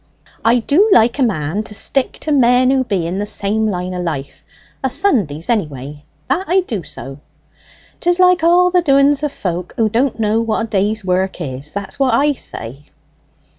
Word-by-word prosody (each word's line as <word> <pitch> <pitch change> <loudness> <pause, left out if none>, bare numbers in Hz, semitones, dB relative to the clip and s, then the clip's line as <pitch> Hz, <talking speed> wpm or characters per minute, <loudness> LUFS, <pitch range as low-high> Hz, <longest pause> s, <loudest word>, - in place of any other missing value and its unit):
"I 230 +2 +4
do 300 - +2
like 235 - +4
a - - +1
man 190 - 0
to 215 -1 -9
stick 270 +5 0
to 310 - -3
men 255 -2 +4
who 265 -1 +2
be 195 -8 -2
in 180 +3 -3
the 205 - -3
same 210 +2 -1
line 180 -2 -3
o' 180 - -3
life 145 -6 -5 0.4
o' - - +2
Sundays, 230 - 0
anyway 150 - -3 0.2
that 375 - 0
I 375 +2 +4
do 225 - -4
so." 135 -2 -9 0.8
"'Tis 350 0 +1
like 365 -2 +4
all 355 +2 +4
the 360 0 +3
doings 275 -2 +3
of 295 -2 -1
folk 180 -5 -5
who 225 -1 +2
don't 235 +2 0
know 220 +1 +1
what 225 -1 -1
a 225 - -3
day's 210 0 -1
work 185 +1 -1
is, 140 -2 -6
that's 200 +8 -6
what 260 -4 +3
I 290 +4 +3
say." 135 - -9
220 Hz, 190 wpm, -17 LUFS, 180-275 Hz, 0.8 s, I